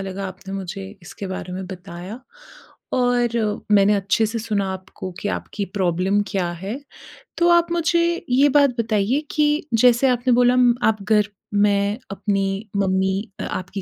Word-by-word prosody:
लगा 195 Hz, 0 st, -4 dB
आपने 190 Hz, +1 st, -10 dB
मुझे 195 Hz, 0 st, -5 dB, 0.2 s
इसके 185 Hz, +3 st, -8 dB
बारे 185 Hz, -1 st, -6 dB
में 185 Hz, +1 st, -5 dB
बताया 185 Hz, +4 st, -8 dB, 0.7 s
और 245 Hz, -1 st, +2 dB, 0.4 s
मैंने 205 Hz, 0 st, +5 dB
अच्छे 200 Hz, +2 st, +1 dB
से 225 Hz, +2 st, -3 dB
सुना 210 Hz, -3 st, -1 dB
आपको 190 Hz, 0 st, -8 dB
कि 205 Hz, -, -2 dB
आपकी 205 Hz, -1 st, -3 dB
प्रॉब्लम 190 Hz, +1 st, +1 dB
क्या 185 Hz, -4 st, -1 dB
है, 195 Hz, +10 st, -6 dB, 0.6 s
तो 345 Hz, 0 st, +3 dB
आप 345 Hz, 0 st, +4 dB
मुझे 340 Hz, 0 st, +2 dB, 0.3 s
ये 270 Hz, +4 st, +4 dB
बात 285 Hz, -1 st, +4 dB
बताइए 225 Hz, +4 st, +1 dB
कि 300 Hz, 0 st, +1 dB
जैसे 240 Hz, +3 st, +5 dB
आपने 250 Hz, 0 st, +2 dB
बोला 245 Hz, +1 st, +4 dB, 0.3 s
आप 215 Hz, -2 st, +1 dB
घर 210 Hz, 0 st, +2 dB, 0.2 s
में 205 Hz, 0 st, +2 dB
अपनी 195 Hz, +1 st, -2 dB
मम्मी 190 Hz, +1 st, 0 dB, 0.2 s
आपकी 185 Hz, +2 st, -4 dB
205 Hz, 150 wpm, -22 LUFS, 190-245 Hz, 0.7 s, मैंने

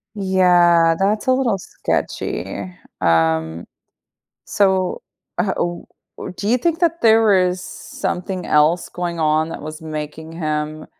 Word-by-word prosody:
Yeah, 175 Hz, -4 st, +4 dB
that's 210 Hz, +5 st, 0 dB
a 260 Hz, -, +5 dB
little 250 Hz, -6 st, +1 dB
sketchy. 95 Hz, -, -4 dB, 0.3 s
Um, 80 Hz, 0 st, +1 dB, 0.8 s
so, 190 Hz, -2 st, +1 dB, 0.4 s
uh 190 Hz, -, +1 dB
oh, 175 Hz, 0 st, -3 dB, 0.5 s
do 205 Hz, -, -3 dB
you 240 Hz, -, +4 dB
think 330 Hz, +5 st, 0 dB
that 335 Hz, 0 st, +1 dB
there 220 Hz, -2 st, +5 dB
is 180 Hz, 0 st, -2 dB
something 180 Hz, 0 st, -5 dB
else 155 Hz, +4 st, +3 dB
going 175 Hz, -1 st, -4 dB
on 155 Hz, 0 st, +1 dB
that -, -, -7 dB
was 155 Hz, +2 st, -8 dB
making 155 Hz, 0 st, -6 dB
him, 155 Hz, -1 st, -3 dB
175 Hz, 125 wpm, -20 LUFS, 155-195 Hz, 0.8 s, a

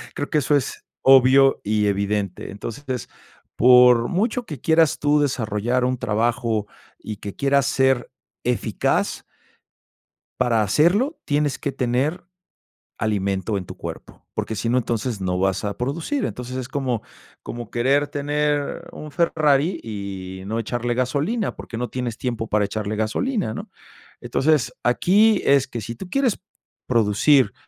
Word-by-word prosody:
Creo 145 Hz, -, -3 dB
que 155 Hz, -, +2 dB
eso 145 Hz, +2 st, +2 dB
es 140 Hz, -, -2 dB, 0.2 s
obvio 135 Hz, +1 st, +6 dB
y 105 Hz, 0 st, +1 dB
evidente. 100 Hz, -1 st, -1 dB
Entonces, 125 Hz, +5 st, -6 dB, 0.5 s
por 125 Hz, -1 st, +6 dB
mucho 225 Hz, +6 st, -1 dB
que 150 Hz, -6 st, -7 dB
quieras 160 Hz, 0 st, +3 dB
tú 145 Hz, 0 st, +3 dB
desarrollar 125 Hz, -2 st, 0 dB
un 130 Hz, 0 st, 0 dB
trabajo 115 Hz, -1 st, 0 dB, 0.3 s
y 105 Hz, -1 st, -7 dB
que 100 Hz, 0 st, -7 dB
quieras 140 Hz, -1 st, +2 dB
ser 130 Hz, -2 st, +2 dB, 0.3 s
eficaz -, -, 0 dB, 1.2 s
para 115 Hz, -2 st, +2 dB
hacerlo, 180 Hz, -, +2 dB
tienes 145 Hz, -2 st, 0 dB
que 140 Hz, -, -2 dB
tener 130 Hz, +8 st, -1 dB, 0.7 s
alimento 100 Hz, -1 st, -1 dB
en 90 Hz, -, -5 dB
tu -, -, -9 dB
cuerpo, -, -, -9 dB
porque 110 Hz, -, -3 dB
si 110 Hz, +4 st, -2 dB
no, 125 Hz, -, +2 dB
entonces, 115 Hz, -2 st, -2 dB
no 90 Hz, -1 st, -1 dB
vas 95 Hz, +1 st, 0 dB
a 100 Hz, -, -2 dB
producir. 160 Hz, -, -2 dB
Entonces, 125 Hz, +1 st, -5 dB
es 130 Hz, -2 st, -4 dB
como 130 Hz, -5 st, -2 dB, 0.4 s
como 120 Hz, -2 st, -7 dB
querer 135 Hz, +4 st, +2 dB
tener 145 Hz, 0 st, -1 dB
un 150 Hz, -, -9 dB
Ferrari 155 Hz, -1 st, +2 dB
y 95 Hz, -3 st, -6 dB
no 110 Hz, +3 st, -2 dB
echarle 120 Hz, +2 st, -2 dB
gasolina, 145 Hz, -, -1 dB
porque 115 Hz, -, -8 dB
no 125 Hz, 0 st, -3 dB
tienes 125 Hz, -3 st, -4 dB
tiempo 120 Hz, -3 st, -2 dB
para 105 Hz, -1 st, +1 dB
echarle 105 Hz, +1 st, -3 dB
gasolina, 110 Hz, -, -1 dB
¿no? -, -, -7 dB, 0.5 s
Entonces, 150 Hz, -4 st, +1 dB
aquí 205 Hz, -, +4 dB
es 140 Hz, -1 st, +4 dB
que 120 Hz, -3 st, -5 dB
si 115 Hz, +3 st, -6 dB
tú 180 Hz, +8 st, -9 dB
quieres 270 Hz, -6 st, +1 dB, 0.5 s
producir 115 Hz, +1 st, +3 dB
125 Hz, 145 wpm, -22 LUFS, 110-145 Hz, 1.2 s, obvio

